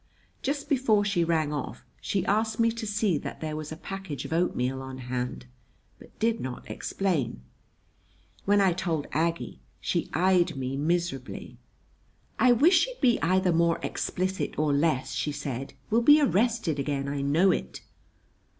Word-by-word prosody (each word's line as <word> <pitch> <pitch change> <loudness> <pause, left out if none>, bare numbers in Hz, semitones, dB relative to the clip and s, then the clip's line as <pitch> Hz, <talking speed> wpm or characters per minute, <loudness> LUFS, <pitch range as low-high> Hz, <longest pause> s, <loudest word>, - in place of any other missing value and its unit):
Just 280 +1 -2
before 235 -7 +2
she 200 -4 +1
rang 160 -3 +1
off, 145 -3 -5 0.2
she 195 - -1
asked 220 +2 0
me 230 0 +4
to 225 -1 -5
see 205 -6 +1
that - - -7
there 155 -1 -4
was 155 0 -6
a 155 - -6
package 195 -5 -6
of - - -4
oatmeal 135 -6 0
on 130 0 -7
hand, 125 0 -4 0.5
but - - -17
did 225 +1 +1
not 130 -1 -6
explain. 150 - -2 1.0
When 205 +1 +4
I 190 -3 +4
told 165 -5 -2
Aggie 165 +2 -1 0.2
she 170 - -1
eyed 180 -3 +3
me 130 0 -3
miserably. 155 -3 -2 0.8
"I 250 - +6
wish 320 - +5
she'd - - -2
be 245 -3 +3
either 185 +1 +2
more 170 0 +3
explicit 185 +1 -2
or 150 -1 +2
less," 140 -3 +1
she 135 +4 -1
said. 135 -2 -5 0.2
"We'll 230 +2 +4
be 295 +5 +7
arrested 225 - +1
again. 140 0 -2
I 140 0 -2
know 160 +7 +4
it!" 65 - -3
170 Hz, 160 wpm, -27 LUFS, 140-205 Hz, 1.0 s, be